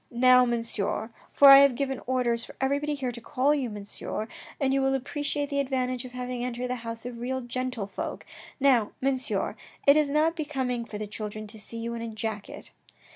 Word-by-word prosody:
" - - -41
Now, 250 +1 +6
Monsieur, 230 -2 -2 0.2
for 280 - +8
1 275 0 +11
have 280 -3 +5
given 270 0 -2
orders 240 -2 +1
for - - -11
everybody 285 +2 0
here 260 -3 -2
to 235 0 -8
call 270 +5 +2
you 270 -5 -1
Monsieur, 210 +1 -5 0.3
and 270 -1 +2
you 275 - +2
will 270 0 +2
appreciate 290 +2 -2
the 280 - 0
advantage 255 -2 -1
of 250 - -10
having 250 -1 -4
entered 250 0 -3
the 250 - -1
house 230 0 -7
of 245 -1 -6
real 260 +2 -2
gentle 250 -3 -3
folk, 195 - -6 0.3
now, 255 -6 +3
Mon 270 0 +1
sieur, 255 +2 -2 0.3
it 280 - +8
is 305 -2 +3
not 310 +3 +2
becoming 260 -6 -2
for 210 - -7
the 215 - -4
children 215 +1 -6
to 215 +1 -12
see 230 +2 -9
you 230 +1 -3
in 230 - -5
a 230 - -4
jacket." 220 -2 -6
250 Hz, 210 wpm, -27 LUFS, 230-275 Hz, 0.3 s, 1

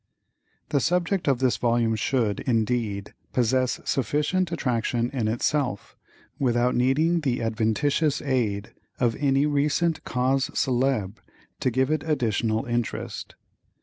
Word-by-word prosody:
The 140 - +2
subject 180 +4 0
of 135 -3 +3
this 130 -1 +1
volume 115 -1 +1
should, 110 -1 0
indeed, 110 -4 -1 0.2
possess 130 +1 +1
sufficient 150 - 0
attraction 120 -5 -1
in 125 -5 -1
itself, 120 0 -1 0.4
without 125 -1 +2
needing 150 +8 +2
the 130 -6 -1
adventitious 120 +7 +1
aid 110 -8 -1 0.3
of 120 -3 +2
any 140 0 +2
recent 150 +3 +1
causes 130 +2 0
célèbres 125 -6 0 0.4
to - - +1
give 130 +4 +1
it 155 -1 +1
additional 115 -7 0
interest. 120 -1 -3
125 Hz, 115 wpm, -25 LUFS, 115-145 Hz, 0.4 s, of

